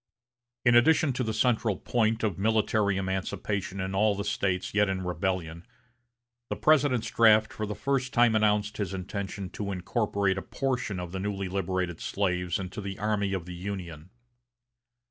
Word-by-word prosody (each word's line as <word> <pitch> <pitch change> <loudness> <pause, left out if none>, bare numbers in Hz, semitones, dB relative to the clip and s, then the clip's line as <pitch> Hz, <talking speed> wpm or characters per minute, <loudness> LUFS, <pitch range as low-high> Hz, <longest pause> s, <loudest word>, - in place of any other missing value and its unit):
In 120 - +6
addition 140 +3 +5
to 130 - -1
the 110 - -1
central 110 -2 +1
point 115 -1 0
of 100 -4 -1
military 105 -1 +2
emancipation 95 0 -3
in 95 +1 -3
all 105 +1 +3
the 100 - -3
States 95 -2 -1
yet 105 -1 +3
in 95 -1 -2
rebellion, 90 -1 -2 0.9
the - - -1
President's 140 -6 +3
draft 110 -1 +5
for 110 - -4
the 105 - -4
first 130 +3 -1
time 120 -2 +4
announced 105 -1 +2
his 100 -2 -2
intention 95 0 -5
to 100 -1 -4
incorporate 100 0 0
a - - -6
portion 125 -7 -2
of 90 -1 -6
the 95 - -4
newly 100 -1 -2
liberated 95 -2 -2
slaves 90 -3 -1
into 95 +2 -6
the 95 -1 -5
armies 100 -2 0
of 90 -3 -4
the 90 - -7
Union. 90 -3 -6
100 Hz, 165 wpm, -28 LUFS, 95-110 Hz, 0.9 s, In